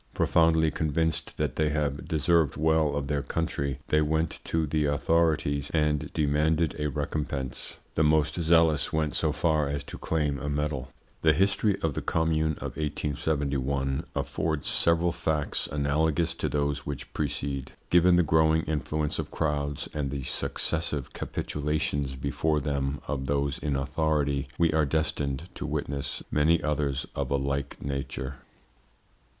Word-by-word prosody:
Profoundly 80 -1 +4
convinced 80 +2 -1
that - - -1
they 75 -1 +2
have 75 -2 -1
deserved 80 -2 +2
well 80 -1 +2
of 70 -1 -1
their 70 0 0
country, 70 -3 -2
they 75 - +4
went 80 +2 0
to 80 -1 +1
the 75 0 0
authorities 75 -1 +1
and 75 -1 +1
demanded 75 +1 +1
a 75 - 0
recompense. 70 -3 -3 0.2
The 80 - +2
most 80 +2 +2
zealous 80 -1 +4
went 80 -1 0
so 80 - +1
far 75 -2 +1
as 70 0 -2
to - - -9
claim 75 -4 0
a 75 - -3
medal. 70 -2 -2 0.3
The 80 -1 +5
history 100 +2 +2
of 80 -3 +1
the - - -3
Commune 80 -1 +1
of - - -6
1871 70 -2 -1
affords 80 -3 -1
several 85 +1 +2
facts 75 -3 -1
analogous 80 +3 +1
to - - -2
those 75 0 0
which 70 -1 -6
precede. 70 -2 -2 0.2
Given 90 +1 +6
the 90 - +5
growing 80 0 +3
influence 75 0 -1
of - - -3
crowds 75 -2 -1
and 75 -3 -2
the 70 -1 -4
successive 75 +2 -2
capitulations 75 -2 -2
before 75 +3 0
them 70 -1 -2
of 65 -2 -2
those 70 +1 0
in 75 -3 -1
authority, 70 0 0
we 85 -2 +3
are 80 0 +3
destined 75 0 -1
to - - -5
witness 70 0 -3
many 80 +3 +4
others 70 -3 0
of - - -2
a 70 - +2
like 70 +1 -2
nature. 70 -1 -4
75 Hz, 145 wpm, -28 LUFS, 70-80 Hz, 0.3 s, Given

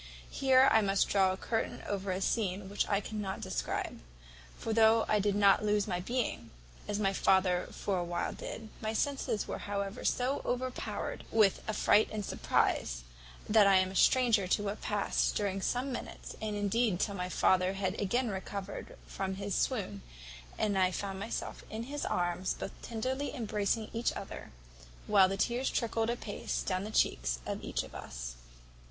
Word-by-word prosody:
Here 265 0 +5
I 220 - +6
must 195 -1 +2
draw 190 -2 +4
a 185 - -3
curtain 225 +3 -2
over 200 -1 -3
a 185 +1 -1
scene 195 -2 -1
which 205 - -1
I 200 -1 +2
cannot 205 -2 -4
describe; - - -3 0.6
for 225 - -3
though 225 0 +5
I 210 - +3
did 205 0 +1
not 200 0 +5
lose 210 -1 +2
my 180 -3 -1
being, 200 - -2 0.4
as 205 - -1
my 195 -2 +1
father 185 -2 +3
for 195 -3 -2
a - - -1
while 175 0 -2
did, 220 -1 -7
my 220 0 -2
senses 265 -4 -1
were - - -4
however 200 +2 -4
so 255 +3 +1
overpowered 250 +1 -3
with 210 -4 +4
affright 215 0 +4
and 210 -2 -3
surprize, - - 0 0.4
that 210 -1 +6
I 195 - +6
am 185 0 +3
a - - -9
stranger 230 -4 +4
to 205 - +1
what 205 +1 -3
passed 205 -1 0
during 195 -2 -1
some 250 +6 -1
minutes, 245 - -6
and 215 -1 -2
indeed 205 -1 +1
till 200 - 0
my 180 -2 -3
father 185 0 +3
had 195 +1 -2
again 240 +5 +1
recovered 195 +1 -6
from 190 -1 -3
his 200 0 -3
swoon, 200 - -1 0.6
and 205 -3 +1
I 185 -1 +4
found 195 +1 -4
myself 225 +4 -4
in 220 +1 -4
his 290 +4 -4
arms, 175 +1 0
both - - -5
tenderly 260 +6 -3
embracing 215 -2 -1
each 230 +1 +1
other, - - -7 0.6
while 195 -3 +5
the 195 - -2
tears 240 +5 +1
trickled 225 -1 0
a 235 - +1
pace 210 -4 -4
down 185 0 -1
the - - -5
cheeks - - +1
of - - -4
each - - -2
of - - -12
us. - - -6
205 Hz, 175 wpm, -32 LUFS, 190-225 Hz, 0.6 s, I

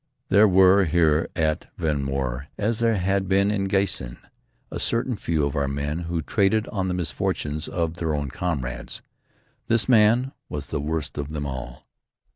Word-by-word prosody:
There 105 +2 +6
were 95 +1 +5
here 80 -1 +2
at 80 +1 0
Vehnmoor, 70 -4 -2
as 110 +2 -1
there 115 -1 +2
had 95 0 0
been 100 +2 +3
at 100 -2 -1
Giessen, 95 -11 -1 0.5
a - - -4
certain 120 +1 0
few 80 -7 0
of 70 - -3
our 70 - +1
own 70 0 -3
men 75 +3 -2
who 85 -1 -3
traded 110 +2 +1
on 95 -3 -2
the 90 - -1
misfortunes 75 -2 -2
of 85 -1 -2
their 80 -3 -1
own 70 -2 -3
comrades. 65 -9 -4 0.6
This 115 -4 +3
man 120 +2 +4 0.2
was 75 -1 -5
the 75 - -2
worst 75 -1 -3
of 70 0 -4
them 75 -2 -4
all. 65 -3 -7
85 Hz, 170 wpm, -24 LUFS, 75-100 Hz, 0.6 s, There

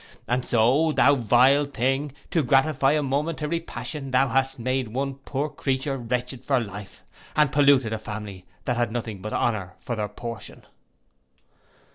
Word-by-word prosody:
And 125 +1 0
so, 125 +7 +3
thou 140 -1 +5
vile 130 +3 +4
thing, 135 +1 -1 0.2
to 165 - +2
gratify 135 +1 +3
a 150 -1 +1
momentary 150 +3 -1
passion, 150 -4 -6
thou 130 +1 +3
hast 135 +2 +1
made 130 +1 -1
one 135 +5 -2
poor 135 +2 -3
creature 135 -1 -2
wretched 125 +1 -3
for 135 -2 +2
life, 100 -3 -8 0.3
and 150 -3 +4
polluted 140 -6 +4
a 110 - -3
family 105 -3 -7 0.2
that 125 -2 0
had 120 -2 0
nothing 110 -4 -4
but 110 +2 -5
honour 100 -6 -1
for 120 - -4
their 105 -2 -2
portion. 115 +1 -8
130 Hz, 155 wpm, -25 LUFS, 115-140 Hz, 0.3 s, thou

